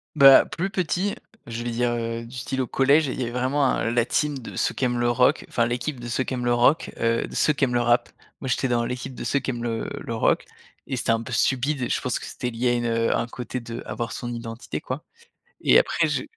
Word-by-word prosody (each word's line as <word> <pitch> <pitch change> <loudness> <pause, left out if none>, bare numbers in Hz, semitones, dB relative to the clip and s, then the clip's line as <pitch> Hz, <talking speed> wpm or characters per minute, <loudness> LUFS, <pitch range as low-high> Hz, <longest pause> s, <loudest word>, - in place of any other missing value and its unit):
Bah, 135 -2 +9
plus 190 +4 -3
petit, 185 +2 -1 0.3
je 115 0 -5
vais 120 - -2
dire, 120 +1 +1
heu, 115 0 -3
du 120 - -13
style 130 +2 -2
au 125 - -2
collège, 140 +4 +3
il 130 - -4
y - - 0
avait 120 - -3
vraiment, 130 +3 +1
un 115 -3 +1
la 120 -1 +2
team 150 +1 0
de 120 - -9
ceux - - 0
qui 130 - -1
aiment 120 -1 0
le 120 0 +2
rock, 125 +5 +3
enfin 115 - +1
l'équipe 125 +3 -3
de 120 - -7
ceux 125 +3 0
qui 130 - -4
aiment 125 -1 -2
le 120 - +3
rock, 125 +6 +3
heu, 115 0 +1
de - - -10
ceux - - +3
qui 140 -2 +1
aiment 125 - -3
le 120 - +2
rap. 120 0 +2 0.3
Moi, 130 - -5
j'étais 130 +1 0
dans 120 -1 +1
l'équipe 130 +2 -5
de - - -7
ceux 140 - +1
qui 135 - -5
aiment 120 -1 -5
le 115 -1 -2
le 115 - -5
rock. 110 - +2 0.4
Et 130 - -2
c'était 120 - 0
un 115 0 +1
peu 120 +2 -7
stupide 135 +3 +1
et 125 - -1
je - - +1
pense 125 -2 -1
que - - -8
c'était 125 -2 -4
lié 120 +1 0
à - - +3
une 120 0 0
heu 115 0 +1
un - - -1
côté 125 +1 -5
d'avoir 115 0 -5
son 120 -1 -5
identité 115 0 -5
quoi. 130 +4 -5 0.6
Et - - +6
après - - +2
je - - -1
120 Hz, 270 wpm, -24 LUFS, 120-135 Hz, 0.6 s, Bah